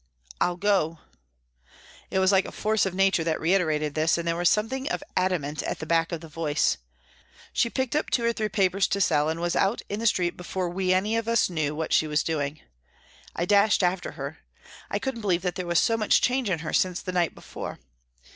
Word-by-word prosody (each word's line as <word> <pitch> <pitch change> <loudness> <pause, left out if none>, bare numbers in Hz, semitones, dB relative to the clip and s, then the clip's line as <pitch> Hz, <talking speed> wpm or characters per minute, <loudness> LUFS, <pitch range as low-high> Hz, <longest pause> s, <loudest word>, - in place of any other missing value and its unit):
" 60 - -19
I'll 175 0 +1
go." 185 -5 +1 1.1
It 190 - -2
was 190 0 +4
like 190 -1 +3
a - - -7
force 215 -2 +1
of 185 - -5
nature 195 -3 +3
that 160 -1 -1
reiterated 155 -4 +1
this, 160 +2 +2
and 170 0 -4
there 165 - +1
was 175 0 +3
some 210 +2 +2
thing 265 +4 -4
of - - -2
adamant 170 -5 0
at - - -3
the - - -6
back 165 +1 +1
of 170 -2 -4
the 165 - -9
voice. 150 - 0 0.8
She 235 - +2
picked 260 +2 -2
up 300 - 0
two 235 - +1
or 235 - +2
three 215 -2 -2
papers 195 -1 +2
to 200 - -1
sell, 150 -5 +2
and 160 +1 -2
was 175 0 -1
out 195 +5 +1
in 205 - -3
the 230 - +1
street 180 -4 +1
before 180 0 -3
we 185 +1 -1
any 205 +5 +2
of 230 0 -2
us 230 -5 +2
knew 150 -3 -1
what 160 0 -2
she 155 - +3
was 150 0 +1
doing. 150 -2 -2 0.7
I 170 - -1
dashed 205 +1 +4
after 180 0 0
her. 140 +1 -7 0.5
I - - -1
couldn't 265 -4 -4
believe 180 -4 0
that 180 -1 -1
there 180 -1 -5
was 170 0 +1
so 225 +5 +3
much 215 -2 +3
change 250 -3 +1
in 180 - +1
her - - -4
since 185 -1 +1
the 185 - -5
night 175 -2 0
before. - - -7
180 Hz, 230 wpm, -26 LUFS, 165-205 Hz, 1.1 s, was